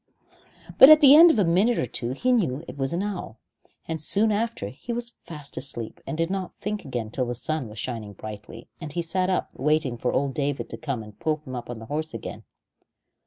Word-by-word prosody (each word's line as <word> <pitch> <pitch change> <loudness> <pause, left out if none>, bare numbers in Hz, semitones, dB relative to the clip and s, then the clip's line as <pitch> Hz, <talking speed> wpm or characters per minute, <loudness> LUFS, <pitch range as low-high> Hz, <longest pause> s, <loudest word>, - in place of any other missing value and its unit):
But 265 - +11
at 310 0 +10
the 285 -1 +9
end 335 +3 +10
of 320 - +3
a 205 - +4
minute 195 +8 +3
or - - +1
two 120 0 -3
he 250 - 0
knew 165 - +1
it - - -8
was 135 0 -2
an 175 +3 -1
owl, 190 - -5 0.5
and 160 -2 -3
soon 210 +7 +2
after 220 - -2
he 140 - -8
was 240 0 -3
fast 150 -4 -8
asleep 120 -4 -4
and 155 - -3
did 165 +2 0
not 190 -2 -4
think 210 +1 -3
again 120 -5 -4
till 125 0 -1
the 120 - -3
sun 130 +2 -3
was 105 +1 -11
shining 110 -3 -5
brightly, 105 +1 -9
and 155 -3 -7
he 170 +3 -2
sat 185 +3 0
up 185 - -1
waiting 145 -4 0
for 125 - 0
old 140 -1 0
David 140 0 -2
to - - -4
come 140 -7 -4
and 105 -1 -14
pull 155 0 +1
him 130 -2 -6
up 120 - -6
on 120 - -5
the 115 - -9
horse 150 +1 -4
again. 115 - -7
150 Hz, 230 wpm, -25 LUFS, 125-195 Hz, 0.5 s, But